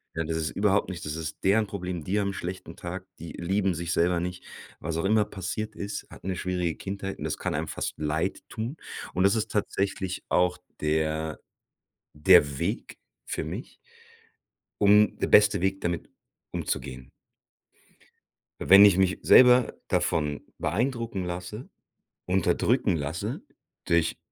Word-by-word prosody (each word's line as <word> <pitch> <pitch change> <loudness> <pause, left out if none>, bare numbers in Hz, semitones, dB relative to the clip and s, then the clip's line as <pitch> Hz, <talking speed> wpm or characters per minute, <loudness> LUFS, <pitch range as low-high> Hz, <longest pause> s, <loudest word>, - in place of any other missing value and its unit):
Ja, 80 -1 -1
das 80 0 -2
ist 80 -1 -2
überhaupt 100 -1 +1
nicht 90 -4 -6
das 75 +1 -3
ist 80 -1 -6
deren 105 +2 +3
Problem, 90 -5 -5
die 100 +5 0
haben 100 -1 0
'n - - -8
schlechten 90 0 -6
Tag, 90 +2 -6
die 85 - -8
lieben 95 +2 0
sich 85 +1 -3
selber 85 +1 +2
nicht. 90 +1 -5 0.4
Was 80 +1 -3
auch 85 - -1
immer 105 +1 +4
passiert 105 +2 -5
ist, 100 0 -5
hatten - - -11
'ne 95 - -1
schwierige 90 -2 -2
Kindheit 95 0 -5
und - - -7
das - - -2
kann - - -2
einem - - -3
fast - - -4
leidtun. 95 - -3 0.4
Und 95 - +1
das 100 +3 +4
ist 110 - -2
tatsächlich 95 -2 -2
auch 90 0 +2 0.2
der 80 0 -1 0.7
der 75 -3 +5
Weg - - -3 0.3
für - - -3
mich 90 - -7 1.1
um 105 +1 +6
der - - 0
beste 105 -3 +5
Weg 95 0 0
damit 85 -2 -3 0.4
umzugehen. 65 -2 -4 1.5
Wenn 100 +1 +9
ich 100 -3 +6
mich 95 -1 +2
selber 125 -1 +7
davon 75 -1 0 0.2
beeindrucken 115 - -1
lasse, 90 +7 -6 0.6
unterdrücken 95 +4 +2
lasse 75 +2 -3 0.5
durch 85 -1 +1
90 Hz, 150 wpm, -27 LUFS, 80-100 Hz, 1.5 s, Wenn